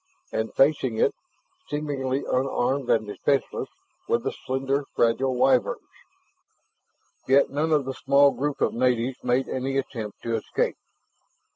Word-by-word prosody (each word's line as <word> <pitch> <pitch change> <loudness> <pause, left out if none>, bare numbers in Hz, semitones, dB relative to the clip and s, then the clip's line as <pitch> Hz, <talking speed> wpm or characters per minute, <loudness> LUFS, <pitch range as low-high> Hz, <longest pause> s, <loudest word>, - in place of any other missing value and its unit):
And 110 0 -2
facing 135 -5 +3
it, - - +3 0.6
seemingly 140 -3 -2
unarmed 130 0 0
and 110 -1 +3
defenseless, 135 +6 -1 0.4
were - - +3
the 115 - -3
slender, 135 +2 -2
fragile 125 +3 +2
Wyverns. 130 -1 +2 1.4
Yet 135 +1 +4
none 150 +3 0
of 150 -3 +3
the 135 - -3
small 140 +1 +4
group 145 +1 -3
of - - +2
natives 125 +1 0
made 125 +1 +1
any 135 +1 -2
attempt 115 -6 -5
to 115 - -2
escape. 110 - -1
130 Hz, 130 wpm, -25 LUFS, 125-140 Hz, 1.4 s, Yet